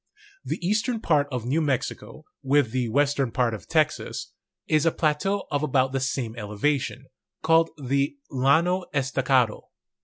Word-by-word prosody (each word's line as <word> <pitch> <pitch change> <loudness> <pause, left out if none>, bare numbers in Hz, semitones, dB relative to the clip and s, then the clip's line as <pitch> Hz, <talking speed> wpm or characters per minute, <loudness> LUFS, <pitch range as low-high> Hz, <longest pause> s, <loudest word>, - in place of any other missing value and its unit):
The - - -3
eastern 220 +4 0
part 150 -8 +2
of 125 -3 -3
New 145 +7 +1
Mexico, 140 +1 -3 0.2
with 140 -3 +2
the 125 -2 -1
western 140 +1 +1
part 120 -2 +1
of 110 - -8
Texas, 155 -2 -1 0.3
is 155 -1 +2
a - - +4
plateau 170 +7 0
of 145 -1 0
about 135 -3 +1
the 135 - -1
same 130 -3 -2
elevation, 125 +5 -2 0.4
called 165 +1 +4
the 140 - -1
Llano 160 +8 +2
Estacado. 130 -4 +1
140 Hz, 145 wpm, -25 LUFS, 130-155 Hz, 0.4 s, a